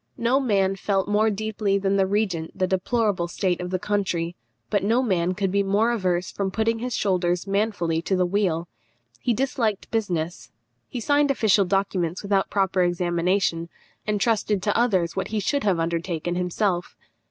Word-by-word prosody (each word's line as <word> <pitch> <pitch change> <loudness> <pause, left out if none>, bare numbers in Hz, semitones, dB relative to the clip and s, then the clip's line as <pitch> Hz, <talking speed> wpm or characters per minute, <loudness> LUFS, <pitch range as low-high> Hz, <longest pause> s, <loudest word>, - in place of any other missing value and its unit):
No 240 +4 +2
man 195 -7 +1
felt 195 0 0
more 210 +2 +3
deeply 210 -1 -1
than 195 0 0
the 195 -1 +3
regent 190 -6 -1
the 185 - +2
deplorable 190 0 0
state 180 0 -1
of 180 - -4
the 185 - 0
country, 180 -4 -1 0.4
but 205 -3 +1
no 230 +5 +2
man 185 -5 +1
could 195 -1 -1
be 200 +1 +2
more 205 +4 +2
averse 185 -5 0
from 195 -1 -2
putting 225 +3 0
his 250 0 -3
shoulders 180 -2 0
manfully 195 -5 0
to 190 - 0
the 180 -1 +2
wheel. 175 -3 0 0.5
He 245 - 0
disliked 230 -5 -1
business; 175 - -2 0.4
he 245 - -4
signed 285 +4 +2
official 215 -7 +3
documents 185 -2 -1
without 200 -1 +1
proper 195 -2 +1
examination, 175 0 0 0.4
and 210 -1 0
trusted 210 -3 +1
to 205 - +1
others 190 -8 +2
what 190 - -2
he 215 - -2
should 280 +9 0
have 190 -4 +2
undertaken 170 0 -2
himself. 180 0 -1
195 Hz, 170 wpm, -24 LUFS, 180-210 Hz, 0.5 s, more